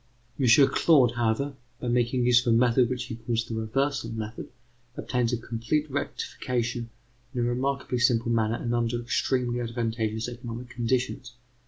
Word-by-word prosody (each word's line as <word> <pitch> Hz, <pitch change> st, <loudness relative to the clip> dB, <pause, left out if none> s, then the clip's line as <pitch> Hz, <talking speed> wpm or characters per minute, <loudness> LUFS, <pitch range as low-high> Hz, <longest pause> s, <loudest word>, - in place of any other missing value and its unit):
M. 130 Hz, -, +2 dB, 0.2 s
Claude, 140 Hz, -8 st, +5 dB
however, 120 Hz, +4 st, 0 dB, 0.3 s
by 125 Hz, -, -5 dB
making 120 Hz, +1 st, +1 dB
use 125 Hz, 0 st, +5 dB
of 115 Hz, -3 st, +3 dB
a -, -, +5 dB
method 120 Hz, 0 st, +4 dB
which 125 Hz, -1 st, -2 dB
he 125 Hz, -3 st, -6 dB
calls 115 Hz, 0 st, -1 dB
the 115 Hz, -, -6 dB
reversal 115 Hz, +3 st, -1 dB
method, 110 Hz, 0 st, -6 dB, 0.5 s
obtains 125 Hz, -2 st, 0 dB
a 120 Hz, -, 0 dB
complete 120 Hz, +7 st, -2 dB
rectification 120 Hz, -3 st, -3 dB, 0.5 s
in 120 Hz, -, 0 dB
a -, -, +2 dB
remarkably 125 Hz, +1 st, -1 dB
simple 120 Hz, -1 st, +2 dB
manner 115 Hz, -1 st, +1 dB
and 120 Hz, 0 st, -3 dB
under 120 Hz, 0 st, 0 dB
extremely 120 Hz, 0 st, 0 dB
advantageous 115 Hz, -1 st, -2 dB
economic 120 Hz, 0 st, -7 dB
conditions. 125 Hz, 0 st, -2 dB
120 Hz, 155 wpm, -27 LUFS, 115-125 Hz, 0.5 s, Claude